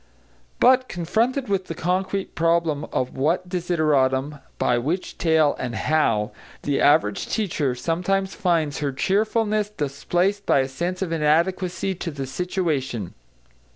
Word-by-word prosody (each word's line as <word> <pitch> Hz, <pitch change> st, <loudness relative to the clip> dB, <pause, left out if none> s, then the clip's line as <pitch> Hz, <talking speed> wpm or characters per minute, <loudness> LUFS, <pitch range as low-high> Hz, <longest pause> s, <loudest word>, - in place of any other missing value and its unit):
But, 255 Hz, +1 st, +5 dB
confronted 230 Hz, -, 0 dB
with 195 Hz, -2 st, 0 dB
the 165 Hz, -, -5 dB
concrete 190 Hz, +3 st, -1 dB
problem 165 Hz, -3 st, +1 dB
of 125 Hz, -, -3 dB
what 165 Hz, +7 st, 0 dB
desideratum 150 Hz, -6 st, +1 dB, 0.2 s
by 120 Hz, -1 st, +2 dB
which 160 Hz, +9 st, -3 dB
tale, 160 Hz, -3 st, +3 dB
and 120 Hz, -2 st, -3 dB
how, 115 Hz, -8 st, +1 dB, 0.3 s
the 145 Hz, -1 st, 0 dB
average 105 Hz, -8 st, +3 dB
teacher 160 Hz, -, -1 dB
sometimes 180 Hz, +8 st, -1 dB
finds 165 Hz, -5 st, 0 dB
her 145 Hz, -2 st, -1 dB
cheerfulness 210 Hz, -, +1 dB
displaced 180 Hz, +4 st, -1 dB
by 135 Hz, -, +4 dB
a 130 Hz, -, -1 dB
sense 175 Hz, +8 st, -3 dB
of 175 Hz, -, -4 dB
inadequacy 170 Hz, +4 st, +1 dB
to 175 Hz, -1 st, -5 dB
the 140 Hz, -3 st, -5 dB
situation. 135 Hz, -, -2 dB
165 Hz, 130 wpm, -23 LUFS, 140-190 Hz, 0.3 s, But